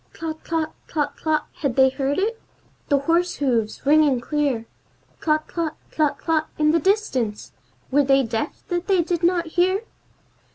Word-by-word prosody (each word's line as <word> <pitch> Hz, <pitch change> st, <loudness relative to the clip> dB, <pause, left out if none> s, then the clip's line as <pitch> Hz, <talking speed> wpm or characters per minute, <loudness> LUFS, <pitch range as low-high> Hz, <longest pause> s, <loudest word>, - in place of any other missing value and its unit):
Tlot 320 Hz, -1 st, -5 dB
tlot, 320 Hz, -1 st, -1 dB, 0.2 s
tlot 295 Hz, -3 st, -2 dB
tlot! 310 Hz, -1 st, 0 dB
Had 275 Hz, -5 st, -1 dB
they 265 Hz, 0 st, +6 dB
heard 270 Hz, +1 st, -1 dB
it? 450 Hz, +4 st, -1 dB, 0.5 s
The 285 Hz, -, +4 dB
horse 335 Hz, +5 st, +1 dB
hooves, 235 Hz, -6 st, -1 dB
ringing 290 Hz, -3 st, +4 dB
clear; 275 Hz, -3 st, -1 dB, 0.6 s
Tlot 310 Hz, -1 st, +1 dB
tlot, 330 Hz, -2 st, -3 dB, 0.2 s
tlot 305 Hz, -2 st, +1 dB
tlot, 315 Hz, -2 st, +1 dB
in 305 Hz, 0 st, +3 dB
the 330 Hz, -, +3 dB
distance! 280 Hz, -, 0 dB, 0.4 s
Were 290 Hz, +2 st, +4 dB
they 270 Hz, 0 st, +4 dB
deaf 230 Hz, +4 st, -3 dB
that 350 Hz, 0 st, -2 dB
they 380 Hz, -4 st, +3 dB
did 345 Hz, 0 st, -1 dB
not 345 Hz, 0 st, +2 dB
hear? 370 Hz, +5 st, +1 dB
310 Hz, 160 wpm, -23 LUFS, 275-340 Hz, 0.6 s, they